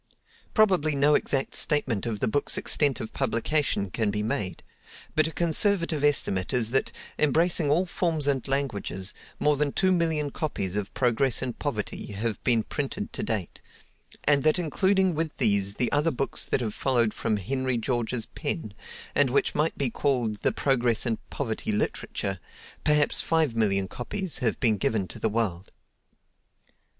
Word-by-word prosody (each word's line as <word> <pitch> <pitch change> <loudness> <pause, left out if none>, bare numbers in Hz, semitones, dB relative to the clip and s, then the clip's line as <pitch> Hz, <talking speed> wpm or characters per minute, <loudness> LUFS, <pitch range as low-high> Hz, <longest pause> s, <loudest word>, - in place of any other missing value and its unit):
Probably 185 -9 +3
no 145 +2 +4
exact 135 -2 0
statement 130 - +1
of 110 -3 -3
the - - +2
book's 140 +6 0
extent 145 -4 +1
of 110 - -6
publication 130 -4 0
can 110 -3 0
be 105 +1 -1
made; 105 -3 -2 0.5
but 155 0 +3
a - - -5
conservative 170 -2 +1
estimate 100 -10 +2
is 120 -3 0
that, 135 - +1 0.3
embracing 160 +1 +3
all 170 +6 +3
forms 165 -4 -1
and 140 -2 0
languages, 105 -8 -2 0.3
more 150 0 +3
than 145 0 0
two 190 +4 +2
million 160 -5 +1
copies 100 - -3
of 105 -1 -2
"Progress 125 +1 +1
and 125 -2 -5
Poverty" 105 -6 -3
have 110 +2 -3
been 115 -3 +3
printed 150 - -4
to - - -4
date; 105 -7 -3 0.6
and 145 -1 +4
that 155 +4 +3
including 190 +3 +2
with 160 0 -3
these 100 -4 +2
the 125 - 0
other 150 +3 +2
books 135 -2 -2
that - - 0
have 110 -3 -2
followed 120 -5 +1
from 110 - -1
Henry 130 +5 -1
George's 120 0 -1
pen, 145 - -5 0.4
and 145 -2 +3
which 140 - +1
might 155 +2 0
be 135 -4 +1
called 120 -7 0
"The - - +1
Progress 125 -4 +1
and 115 -2 -1
Poverty 110 -5 -3
Literature," 95 -2 -2 0.4
perhaps 150 -1 +3
five 160 -7 +1
million 100 -4 +2
copies 175 - -3
have - - 0
been 110 -5 +3
given 100 0 0
to - - -8
the 110 - 0
world. 105 -5 -2
135 Hz, 160 wpm, -26 LUFS, 110-150 Hz, 0.6 s, no